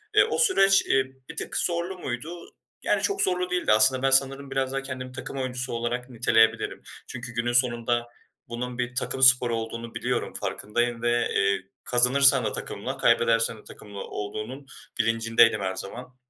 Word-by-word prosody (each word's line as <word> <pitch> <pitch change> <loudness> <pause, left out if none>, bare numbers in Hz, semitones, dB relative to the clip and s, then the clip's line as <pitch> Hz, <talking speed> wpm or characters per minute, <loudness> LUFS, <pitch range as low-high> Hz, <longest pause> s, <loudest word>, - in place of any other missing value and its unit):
Eee, 420 - +7
o 460 0 -2
süreç, 195 - +4
ııı, 135 0 +3 0.2
bir - - -8
tık - - -4
zorlu 175 +2 -1
muydu, 160 +6 -6 0.3
yani, - - +1
çok 400 -1 0
zorlu 180 -1 0
değildi. 180 0 0
Aslında 110 +5 +4
ben 135 - +2
sanırım 135 +1 +1
biraz 135 -1 -1
daha 135 0 -2
kendim 130 -1 -7
takım 130 +1 -7
oyuncusu 125 -1 -3
olarak 120 +2 -3
niteleyebilirim. 110 -2 +2 0.3
Çünkü 120 -1 -7
günün 120 +1 -1
sonunda 120 -1 +1 0.4
bunun 120 +1 -5
bir 125 0 -3
takım 130 +1 -2
sporu 125 -3 +5
olduğunu 115 +1 -6
biliyorum, - - -2
farkındayım 120 +2 -2
ve, 120 0 +1
eee, 100 0 +2 0.2
kazanırsan 130 +1 +4
da 105 - -1
takımla, - - -5
kaybedersen 115 0 +2
de - - -16
takımla 100 -1 -11
olduğunun 110 +8 -6 0.3
bilincindeydim 115 -1 +3
her 95 -1 -2
zaman. 125 +7 -8
125 Hz, 160 wpm, -25 LUFS, 115-135 Hz, 0.4 s, Eee